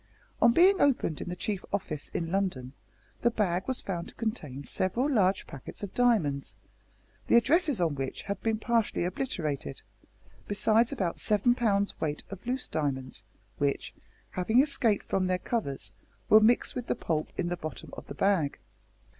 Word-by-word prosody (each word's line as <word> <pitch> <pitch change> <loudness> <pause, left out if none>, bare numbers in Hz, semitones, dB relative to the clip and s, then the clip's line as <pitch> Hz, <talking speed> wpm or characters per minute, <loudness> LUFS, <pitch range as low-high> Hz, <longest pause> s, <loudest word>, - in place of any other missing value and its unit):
On 235 - +7
being 375 +8 +5
opened 255 - +2
in - - -5
the 180 - -3
Chief 200 0 -3
Office 155 -7 -3
in 165 -1 -3
London, 180 -10 -1 0.5
the 235 - +4
bag 190 -5 0
was 260 -1 -1
found 175 -3 -4
to - - -12
contain 155 - -4
several 210 - 0
large 200 -9 +2
packets 140 +8 -9
of 200 - -5
diamonds, 190 - +2 0.7
the - - +4
addresses 290 - +4
on 165 -4 +2
which 135 -1 -4
had 200 - -4
been 225 -1 +1
partially 230 -4 +1
obliterated, 155 - -3 0.6
besides 220 +4 +3
about 190 -11 -2
seven 215 +3 +3
pounds 200 -5 +1
weight 150 -1 -2
of 195 - -8
loose 255 +1 -1
diamonds, 135 -4 -2 0.4
which, 140 -1 -1 0.4
having 220 +7 +2
escaped 240 -8 +2
from 185 -1 0
their 185 0 +1
covers, 180 - -2 0.4
were 215 - +9
mixed 225 +3 +3
with 245 -2 -4
the - - +1
pulp 160 -8 -2
in 175 - -1
the 175 - -1
bottom 155 -6 -7
of - - -10
the 140 - -7
bag. 180 -5 +1
195 Hz, 165 wpm, -29 LUFS, 160-235 Hz, 0.7 s, were